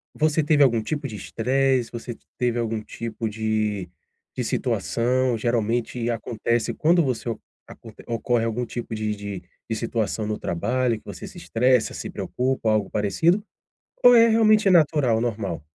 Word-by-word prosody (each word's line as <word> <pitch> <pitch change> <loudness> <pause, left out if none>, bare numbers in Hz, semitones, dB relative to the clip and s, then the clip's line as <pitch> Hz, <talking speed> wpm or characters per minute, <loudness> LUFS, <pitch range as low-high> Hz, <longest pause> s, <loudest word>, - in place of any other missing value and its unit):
você 155 0 +2
teve 145 -1 +4
algum 115 -4 +3
tipo 145 +3 -3
de 110 - -8
estresse, 130 +4 0
você 120 0 -6 0.2
teve 120 -1 0
algum 115 -1 -2
tipo 115 0 -5
de 110 -3 -1 0.5
de - - -2
situação. 125 +1 0
Geralmente 115 +1 -1
acontece 115 0 -1
quando 170 +1 +3
você 125 -3 -2
o 115 - -4 0.3
aconte 110 -2 -13
ocorre 120 0 0
algum 120 +2 -2
tipo 120 -1 -6
de 105 -1 -2
de 100 -2 -6 0.3
de 110 - -1
situação 110 -1 -2
no 105 - -2
trabalho 120 +7 0
que - - -32
você - - -8
se - - -13
estressa, 125 0 +1
se - - -6
preocupa 125 -3 -2
algo 105 -2 +1
parecido, 160 - +1 0.6
ou 245 0 +8
é 230 0 +7
realmente 215 -2 +4
natural, 145 -9 +3
normal? 100 -10 -3
115 Hz, 155 wpm, -24 LUFS, 110-130 Hz, 0.6 s, ou